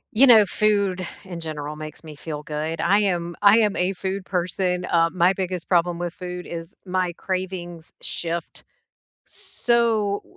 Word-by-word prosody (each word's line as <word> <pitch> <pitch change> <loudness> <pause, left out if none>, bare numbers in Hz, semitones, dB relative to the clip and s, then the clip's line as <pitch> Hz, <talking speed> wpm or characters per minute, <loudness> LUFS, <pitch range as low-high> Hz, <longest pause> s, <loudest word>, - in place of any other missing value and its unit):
You 270 +5 +7
know, 225 -5 +8
food 200 -3 +1 0.2
in 185 -3 -8
general 150 -2 -5
makes 155 0 -8
me 155 -2 -10
feel 150 0 -6
good. 155 +2 -3
I 200 - +4
am 175 -4 -1
I 205 +2 +7
am 210 -2 +2
a 180 +2 +1
food 190 +1 -4
person, 180 0 -1
um, 165 +1 +2
my 180 +2 +5
biggest 185 -2 -4
problem 175 -1 +2
with 175 -1 -2
food 180 -1 -6
is 165 -1 -7
my 185 -1 -1
cravings 180 -3 -4
shift 170 0 -4 0.6
so, 235 - +1
180 Hz, 155 wpm, -23 LUFS, 170-195 Hz, 0.6 s, know